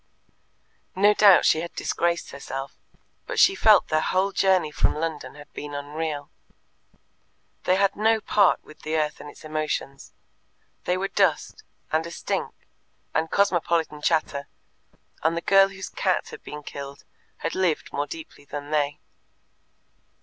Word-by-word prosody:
No 205 +2 +5
doubt 205 -3 +6
she 160 - +4
had 170 - -7
disgraced 170 0 -1
herself. 135 -1 -6 0.5
But - - -4
she 385 - +6
felt 215 - +5
their 155 0 +2
whole 190 +4 +1
journey 190 -5 +2
from - - +1
London 155 -2 -4
had 145 0 -14
been 145 -1 -6
unreal. 145 0 -4 1.3
They 185 - +4
had 195 0 +2
no 220 +2 +3
part 205 -3 +3
with 155 - -15
the 155 +1 -3
earth 150 -1 -1
and 145 - -9
its - - -14
emotions. 155 -3 -3 0.7
They 180 - +1
were 195 +1 -1
dust, - - +1 0.3
and 160 +1 +2
a - - -9
stink, - - -3 0.6
and 160 0 0
cosmopolitan 170 -5 +1
chatter, 150 -3 0 0.7
and 165 +2 +1
the - - +2
girl 195 +2 +6
whose 195 -1 -8
cat - - 0
had - - -10
been 150 0 -8
killed 140 0 -8 0.4
had 165 - -1
lived 180 -5 0
more 145 +1 -1
deeply 160 -2 -9
than 145 +1 -7
they. 145 -1 +1
160 Hz, 150 wpm, -25 LUFS, 150-190 Hz, 1.3 s, doubt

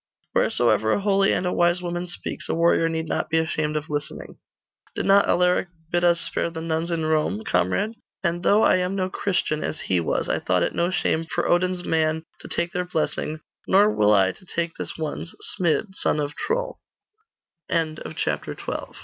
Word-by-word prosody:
'Wheresoever 110 -2 +2
a - - +1
holy 195 -1 +3
and - - 0
a 180 - 0
wise 175 +1 +3
woman 175 0 -3
speaks, 175 - -6
a - - +1
warrior 165 0 +3
need 160 0 -2
not - - -2
be 160 - +2
ashamed 155 -1 0
of 150 0 -4
listening. 145 -1 -4 0.6
Did - - -2
not 200 +1 +5
Alaric 180 +1 +3 0.2
bid 175 0 +1
us 170 -1 +4
spare - - -1
the 165 -1 -6
nuns 160 +1 -2
in 165 -2 -1
Rome, 155 -10 0
comrade? 90 - +1 0.3
And 170 -1 0
though 205 +4 +4
I - - +5
am 180 +1 -1
no 185 -1 -1
Christian 180 -7 -1
as - - -3
he 90 - +1
was, 85 - -1
I - - 0
thought - - +1
it - - -1
no 170 +1 +1
shame 165 -3 0
for 165 - -2
Odin's 180 0 +1
man 160 0 +1 0.2
to - - -10
take 170 - -1
their 180 0 -1
blessing; 155 -2 -2 0.3
nor 205 +2 +5
will 105 0 +4
170 Hz, 160 wpm, -24 LUFS, 155-180 Hz, 0.6 s, not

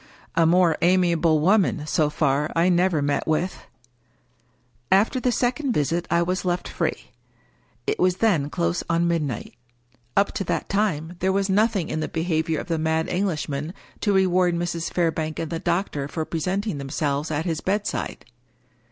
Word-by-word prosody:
A 165 -1 +3
more 175 -1 +4
amiable 170 -3 +3
woman 185 -4 +2
(so 155 0 +1
far) 150 0 0
I 170 +2 +3
never 175 -4 +2
met 145 0 0
with! 165 +4 -1 1.3
After 210 +7 +3
the 250 0 +1
second 250 +3 0
visit 165 +2 0
I 170 0 +3
was 185 +2 -1
left 180 -1 -1
free. - - -3 0.7
It 425 +1 -1
was 185 -1 +3
then 170 -11 +2
close 85 - -1
on 170 +1 +2
midnight. 155 -7 -2 0.6
Up 200 0 +3
to - - -3
that - - -2
time 175 -5 -1
there 190 +1 +1
was 195 0 0
nothing 205 -3 +2
in 155 - -2
the 155 - -2
behavior 160 -1 -1
of - - -7
the 165 -2 -1
mad 160 +1 0
Englishman 165 -4 -2 0.2
to 205 - +1
reward 185 -2 +3
Mrs. 170 -1 -2
Fairbank 160 -3 -1
and 165 -1 -4
the 165 - -2
doctor 170 -6 -1
for 160 +2 -3
presenting 180 +2 -2
themselves 140 +2 -2
at 155 +1 -2
his 165 -3 -2
bedside. 205 +2 -2
170 Hz, 160 wpm, -24 LUFS, 155-190 Hz, 1.3 s, more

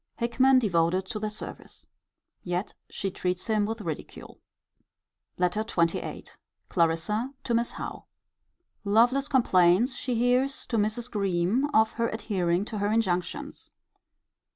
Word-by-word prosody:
Hickman 255 +3 +3
devoted 185 -4 +2
to 215 - -3
their 215 0 -2
service. 210 - -9 0.6
Yet 180 +2 -3 0.2
she 195 - -3
treats 180 0 -2
him 215 -2 +1
with 225 0 -4
ridicule. 160 -6 -7 1.0
LETTER 180 +4 +1
XXVIII. 170 -6 -1 0.4
Clarissa 185 +10 0
to 240 - -1
Miss 235 +1 0
Howe. - - -7 0.8
Lovelace 240 +7 +3
complains, 220 -2 +3
she 250 -2 -2
hears, 250 +3 +1
to 230 - -2
Mrs. 215 +3 -1
Greme, 200 +6 +1
of 220 -4 +4
her 230 0 0
adhering 190 -4 -1
to 215 -1 -5
her 205 - +1
injunctions. 220 +6 -2
215 Hz, 125 wpm, -27 LUFS, 180-240 Hz, 1.0 s, of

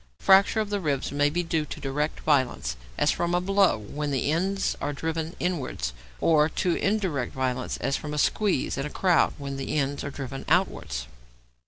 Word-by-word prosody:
Fracture 195 - +5
of 210 -1 -2
the 205 - 0
ribs 145 -7 -1
may 145 0 +2
be 175 +4 -1
due 165 -2 0
to 150 - -7
direct 150 +3 -2
violence, 125 - +1 0.2
as - - +3
from 175 0 0
a - - +3
blow, 195 - +3
when 145 +8 -4
the 140 +1 0
ends 195 +4 0
are 145 - -1
driven 160 +2 -3
inwards, 135 - -2 0.3
or 155 -1 +4
to 175 +2 0
indirect 190 - 0
violence, 130 -1 -1
as 135 - 0
from 150 - -6
a 150 - -3
squeeze 185 -3 +1
in 135 - -1
a - - -7
crowd, 180 +1 +2
when 140 -1 -5
the 135 +3 -2
ends 140 0 -1
are 140 - -3
driven 135 -1 -6
outwards. 150 - 0
150 Hz, 190 wpm, -26 LUFS, 135-175 Hz, 0.3 s, Fracture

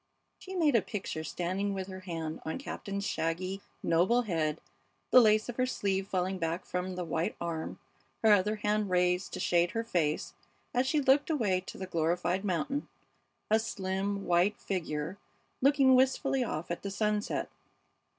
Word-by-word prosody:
She 380 0 -8
made 315 -5 +3
a 230 - +5
picture 190 -7 -4
standing 190 +5 -2
with 190 -1 -3
her 185 -1 -7
hand 165 -4 -5
on 160 - -3
Captain's 200 -7 -5
shaggy, 185 +3 -2 0.2
noble 185 +9 +3
head, 160 -6 -1 0.5
the 255 - +9
lace 215 -1 +4
of 245 - -6
her 255 0 +2
sleeve 195 -5 -1
falling 185 0 -1
back 165 +1 -2
from 180 +1 -3
the 180 -1 -3
white 165 +1 -1
arm, 165 -2 -4 0.5
her 220 - +6
other 205 +2 +3
hand 210 -1 0
raised 180 0 +2
to - - -4
shade 175 0 +3
her 230 - 0
face 165 -9 -1 0.4
as 250 +2 +2
she 300 +3 +2
looked 275 +3 +4
away 210 - +1
to - - -7
the 190 - -4
glorified 175 +2 0
mountain, 275 - -1 0.6
a 220 - +6
slim, 195 -2 -2
white 180 +4 +3
figure 165 -1 -3 0.4
looking 275 -1 +5
wistfully 265 +1 +3
off 170 -7 -4
at 170 - -3
the 200 - -4
sunset. 210 +1 -1
190 Hz, 165 wpm, -31 LUFS, 175-220 Hz, 0.6 s, the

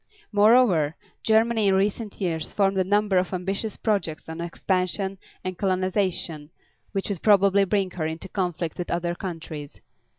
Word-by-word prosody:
Moreover, 205 -8 +4 0.3
Germany 220 -1 +3
in 190 - +4
recent 205 +2 -1
years 165 -5 -2
formed 195 -1 +2
a - - +4
number 205 0 +2
of 185 +1 -2
ambitious 195 +4 -3
projects 195 -8 -1
of 160 +1 -6
expansion 185 +2 -1 0.2
and 185 -1 -4
colonization 185 -5 0 0.4
which 195 0 -3
would 195 -5 -3
probably 200 -1 +5
bring 195 -1 0
her 160 -3 -2
into 160 +1 -5
conflict 175 -4 -3
with 175 - -3
other 175 0 -1
countries. 165 -5 -7
190 Hz, 145 wpm, -25 LUFS, 170-200 Hz, 0.4 s, probably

